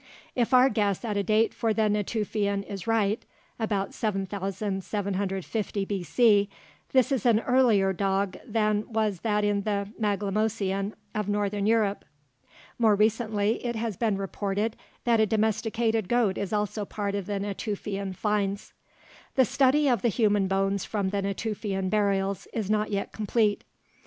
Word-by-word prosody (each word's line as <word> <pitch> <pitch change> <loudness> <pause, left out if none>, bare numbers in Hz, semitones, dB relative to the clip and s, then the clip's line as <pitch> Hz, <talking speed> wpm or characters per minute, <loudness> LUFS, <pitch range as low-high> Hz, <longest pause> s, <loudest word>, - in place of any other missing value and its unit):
If 240 -1 +1
our 255 0 +7
guess 210 -3 0
at 215 -2 -2
a 200 - +2
date 215 +3 +2
for 225 -2 0
the 220 - +2
Natufian 210 -1 -1
is 200 +1 -7
right 220 -1 +1 0.4
(about 205 -3 -1
7750 195 0 -2
B.C.), 200 - +3 0.4
this 260 +1 +3
is 265 -6 +1
an 225 -2 +5
earlier 230 -7 +3
dog 195 0 0
than 215 -2 0
was 215 -4 0
that 210 0 0
in 205 -1 +1
the 200 -1 -2
Maglemosian 205 -1 0 0.2
of 210 -2 -2
northern 205 0 0
Europe. 215 -3 +2 0.8
More 220 -3 +5
recently, 215 0 +1
it 240 -1 -2
has 225 -2 -2
been 215 -1 0
reported 200 +2 -2 0.3
that 235 -2 +3
a 220 - +4
domesticated 220 0 0
goat 235 -6 +2
is 200 -2 -3
also 210 0 -1
part 200 0 -3
of 200 -2 -3
the 205 -1 -2
Natufian 200 -1 -4
finds. 205 0 -1 0.6
The 260 - +5
study 280 +5 +3
of 240 -6 +2
the 240 - +2
human 205 -3 +2
bones 195 0 0
from 200 -3 -1
the 200 0 -1
Natufian 195 -1 -2
burials 200 -3 0
is 215 -3 -2
not 215 0 +1
yet 200 -1 -2
complete. 215 -1 0
210 Hz, 145 wpm, -27 LUFS, 200-220 Hz, 0.8 s, our